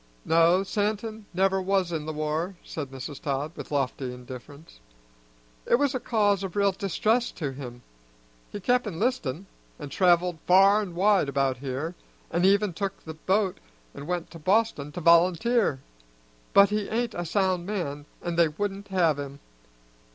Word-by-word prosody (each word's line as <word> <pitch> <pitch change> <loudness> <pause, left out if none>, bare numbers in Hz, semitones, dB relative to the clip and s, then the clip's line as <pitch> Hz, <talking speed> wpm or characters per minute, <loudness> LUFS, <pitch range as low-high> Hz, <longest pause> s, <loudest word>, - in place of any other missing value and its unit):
"No, 170 +3 +4
Santin 215 +1 -2
never 190 +1 +2
was 190 -2 +1
in 155 -2 -3
the - - -2
war," 155 +5 -2
said 145 -4 -6
Mrs. 135 +2 -8
Todd 140 +2 -2
with - - -8
lofty 135 -2 -1
indifference. 125 - -11 0.9
"It - - +5
was 280 +1 +1
a 255 - -1
cause 205 -5 +1
of 190 -3 -5
real 200 -1 +3
distress 215 +5 0
to 145 -6 -4
him. 125 -3 -9 0.7
He 205 - -5
kep' 245 +3 +1
enlistin', 195 - -2 0.3
and 145 -3 -8
traveled 175 -2 +3
far 195 +3 +6
an' 185 -5 -6
wide 195 -4 +3
about 135 -1 0
here, 135 +5 -4 0.4
an' 175 +2 +2
even 200 0 +3
took 195 +3 -4
the 160 - -6
bo't 190 +4 0 0.3
and 145 - -9
went 175 -1 -3
to 165 - -10
Boston 185 -4 +1
to 175 - -5
volunteer; 175 - +3 0.7
but 200 0 +6
he 210 -1 -1
ain't 235 +1 -1
a 175 - -3
sound 185 0 0
man, 150 -8 -4 0.2
an' 175 -1 -3
they 170 -1 +5
wouldn't 200 +5 -4
have 170 -6 +2
him. 140 0 -7
180 Hz, 160 wpm, -26 LUFS, 150-200 Hz, 0.9 s, far